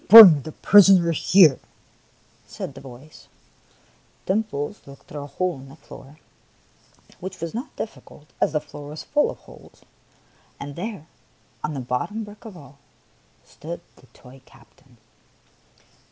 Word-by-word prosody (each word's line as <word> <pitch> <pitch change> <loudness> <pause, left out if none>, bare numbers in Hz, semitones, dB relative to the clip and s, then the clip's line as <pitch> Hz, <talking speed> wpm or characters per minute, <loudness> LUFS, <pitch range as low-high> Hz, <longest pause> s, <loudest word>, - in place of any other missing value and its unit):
" - - -28
Bring 190 -9 +11
the 155 - -8
prisoner 190 -2 +5
here! 165 -2 +5 0.5
" - - -36
said - - -6
the 135 - -12
voice. 135 +3 -14 1.0
Dimples 200 -4 -2
looked 140 0 -14
through 145 - -8
a 145 - -8
hole 175 +2 -3
in 135 +1 -13
the 135 - -14
floor, 150 -2 -14 0.5
— - - -29
which 185 +1 -8
was 165 0 -5
not 245 +7 -7
difficult, 185 -8 -9 0.2
as - - +2
the 150 - 0
floor 145 -1 -11
was 150 +1 -8
full 295 0 +1
of - - -8
holes, - - -18 0.4
— - - -35
and 140 0 -8
there, 195 -3 -6 0.6
on 150 - -3
the - - -4
bottom 125 - -3
brick 210 +2 -14
of 210 -5 -10
all, 140 -2 -16 0.7
stood 170 +3 -9 0.2
the 130 - -21
toy 130 +2 -17
captain. 130 -1 -23
155 Hz, 155 wpm, -23 LUFS, 140-195 Hz, 1.0 s, Bring